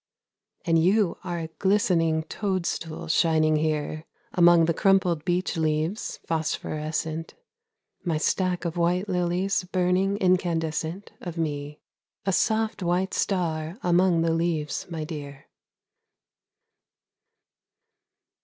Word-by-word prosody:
And 165 -2 +3
you 195 +1 +2
are 175 -2 -3
a 165 -1 -4
glistening 170 -5 +2
toadstool 175 -4 -3
shining 155 -1 +3
here 155 0 -1 0.3
Among 175 -2 +6
the 170 - +1
crumpled 180 -4 +2
beech 180 0 0
leaves 160 +5 -1
phosphorescent, 160 0 -3 0.7
My 165 -4 0
stack 180 +2 0
of 170 +1 -3
white 175 +3 +1
lilies 180 +1 0
burning 185 +2 +1
incandescent 175 -1 0
Of 175 -2 -6
me, 150 -2 -3 0.4
a 195 - +1
soft 220 +2 +1
white 180 +2 0
star 165 -2 -1
among 175 -1 +3
the 165 -1 +2
leaves, 165 -3 -1
my 165 -2 -4
dear. 145 -3 -7
170 Hz, 105 wpm, -26 LUFS, 160-185 Hz, 0.7 s, Among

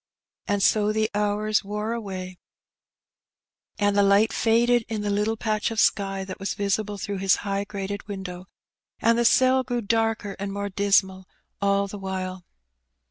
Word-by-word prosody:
And 205 -1 +1
so 210 +1 +3
the 215 +1 0
hours 210 +1 0
wore 210 +3 -3
away, 185 -5 -6 1.4
and 205 -2 +1
the 205 - +5
light 200 +2 +4
faded 235 +1 +3
in 220 -2 -2
the 205 0 -1
little 210 +2 0
patch 215 -1 -1
of 225 -1 -3
sky 195 -1 +1
that 190 -1 -8
was 195 - -3
visible 205 +1 -1
through 200 0 -4
his 195 0 +4
high 200 0 -1
grated 200 0 -5
window, 190 -3 -7 0.5
and 230 0 +3
the 235 - +2
cell 260 +2 +5
grew 245 -1 -2
darker 225 -2 0
and 200 0 -3
more 200 0 -3
dismal 190 -1 +1 0.3
all 200 0 +2
the 200 +1 -8
while. 185 -1 -4
205 Hz, 160 wpm, -25 LUFS, 195-215 Hz, 1.4 s, the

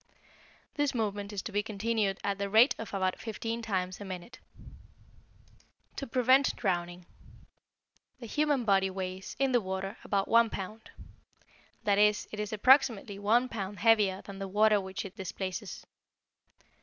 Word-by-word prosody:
This 290 -2 0
movement 205 -2 -2
is 200 -2 -4
to - - -6
be 205 +1 +1
continued 215 -1 -1
at 200 -1 -1
the 200 0 -2
rate 225 +6 +6
of 225 - -6
about 185 -2 -1
fifteen 230 +1 -4
times 185 -4 -3
a - - -4
minute. 185 +3 -8 1.6
=To 275 - -4
Prevent 255 +2 +3
Drowning.= 175 -3 -2 1.1
The 240 - -8
human 290 +1 0
body 195 -2 +3
weighs, 185 0 -6
in 270 -1 +1
the 245 -2 +3
water, 190 +2 -4
about 200 -1 0
one 230 0 +5
pound; 215 +3 -7 0.9
that 205 -2 +2
is, 210 0 +3
it 215 - -6
is 210 -1 -3
approximately 220 -3 +3
one 230 +5 +3
pound 205 -4 -5
heavier 210 -4 +3
than 200 -1 -9
the 195 - -4
water 210 +1 +3
which 190 +1 -6
it 190 - -9
displaces. 190 +1 -5
205 Hz, 150 wpm, -30 LUFS, 195-230 Hz, 1.6 s, rate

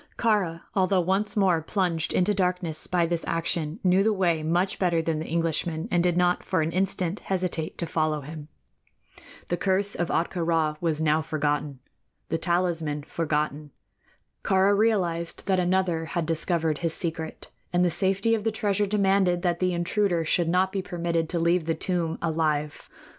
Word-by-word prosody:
Kāra, 195 -8 +1
although 190 -1 +2
once 190 +5 0
more 185 -5 +3
plunged 170 -2 -1
into 190 +3 +2
darkness 180 -4 -1
by 175 -2 +1
this 170 0 -2
action, 165 0 -1
knew 185 +1 +4
the 220 +2 +3
way 175 -6 +1
much 175 +5 0
better 175 -3 +2
than 160 -1 -1
the 160 - -5
Englishman, 165 0 -1
and 175 - +3
did 175 0 +1
not 180 0 +2
for 160 - 0
an 160 - -2
instant 190 0 0
hesitate 180 -4 -2
to 170 - -1
follow 155 -2 -1
him. 150 +1 -9 1.0
The 175 - 0
curse 195 +2 0
of 175 - -2
Ahtka 170 +1 -1
Rā 160 -2 +1
was 160 -3 0
now 155 0 +2
forgotten 150 -3 -2 0.5
the 165 - -1
talisman 170 -5 0
forgotten. 150 -2 -2 0.7
Kāra 195 +1 +3
realized 180 -6 0
that 190 -2 +2
another 180 -2 +1
had 170 0 -2
discovered 165 -1 0
his 165 -2 +2
secret, 160 -2 -4 0.2
and 180 0 +3
the 175 - +1
safety 195 +5 +2
of 220 -2 0
the 225 - +1
treasure 205 -2 0
demanded 195 -3 +2
that 175 -1 0
the 185 0 +1
intruder 175 0 0
should 170 +1 +1
not 185 +2 +2
be 195 - -2
permitted 170 -2 -2
to 170 - -1
leave 170 0 +2
the 165 0 0
tomb 170 -3 -2
alive. 155 -2 -1
170 Hz, 170 wpm, -26 LUFS, 160-190 Hz, 1.0 s, knew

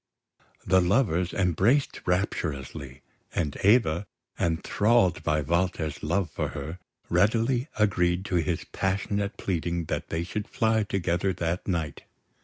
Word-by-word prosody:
The 95 0 +4
lovers 90 -2 +2
embraced 95 - +2
rapturously; 70 -7 -2 0.3
and 75 -5 -1
Eva, 100 -4 +3 0.3
enthralled 95 +5 +2
by 75 -1 +1
Walter's 85 0 -1
love 85 +2 0
for - - -2
her, 80 +6 -6 0.3
readily 115 - +2
agreed 90 -3 +2
to 90 - 0
his 85 0 -1
passionate 100 +1 -2
pleading 85 -2 -2
that - - -4
they 80 +1 -1
should 100 +4 -4
fly 110 -1 +1
together 95 -2 0
that 85 +1 -2
night. 80 -6 -2
90 Hz, 120 wpm, -27 LUFS, 80-100 Hz, 0.3 s, The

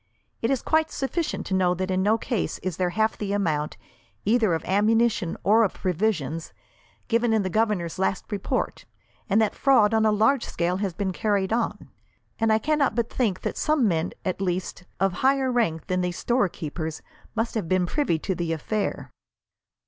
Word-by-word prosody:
It 230 - +1
is 270 -3 0
quite 315 0 +2
sufficient 300 +4 -2
to - - -3
know 180 -1 +3
that 185 +1 -2
in 185 0 +1
no 210 +3 +3
case 230 -2 -2
is 185 -4 -3
there 180 -1 +1
half 220 +4 +1
the 200 -1 -2
amount, 155 -7 -1 0.5
either 215 -4 +3
of 160 - -5
ammunition 210 -2 +2
or 220 +3 +5
of 200 - 0
provisions, 170 -5 -1 0.5
given 230 0 +2
in 220 -2 +2
the 185 - -3
governor's 205 -6 0
last 190 +2 -1
report, 200 -2 -2 0.4
and 200 +3 +4
that 210 - 0
fraud 225 -6 +4
on 220 0 +3
a 215 - +4
large 225 +5 +3
scale 175 +2 -1
has 195 -4 -2
been 195 -1 -1
carried 205 -1 0
on; 230 0 -2 0.5
and 225 -1 +2
I 220 - +5
cannot 295 +4 +1
but 235 -1 -1
think 215 -8 0
that - - -3
some 305 -6 +2
men, 165 -2 0
at 185 0 -2
least, 180 -1 -2
of 195 -1 +2
higher 265 -1 +3
rank 170 -11 0
than 185 0 0
these 180 0 -2
storekeepers 165 - -2 0.3
must 225 +1 -1
have 205 -8 -3
been 185 -1 +2
privy 275 - 0
to 190 +4 -2
the 170 -2 -2
affair." 205 +7 -3
205 Hz, 185 wpm, -25 LUFS, 180-225 Hz, 0.5 s, or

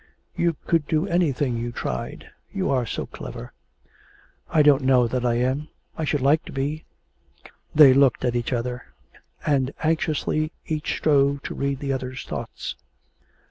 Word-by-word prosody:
You 170 -1 +1
could 165 -3 +1
do 155 +2 +1
anything 145 -9 +1
you 120 +1 -3
tried. 65 - -5 0.2
You 190 -1 -1
are 125 -3 +1
so - - -3
clever.' - - -9 1.0
'I 155 - +4
don't 145 -1 +5
know 130 -2 +4
that 125 +1 -2
I 120 -1 +2
am; 130 +5 0 0.3
I 160 - -2
should 145 -1 0
like 145 +4 +3
to - - -9
be.' 145 +3 -3 0.9
They 145 -4 +9
looked 135 -2 +3
at 120 -1 0
each 120 +1 -1
other, 125 0 -4 0.5
and 140 -3 +2
anxiously 155 -1 0
each 155 -1 -2
strove 140 -2 +2
to - - -5
read 140 0 -1
the 140 -1 -1
other's 130 0 -5
thoughts. - - -5
140 Hz, 155 wpm, -24 LUFS, 125-155 Hz, 1.0 s, They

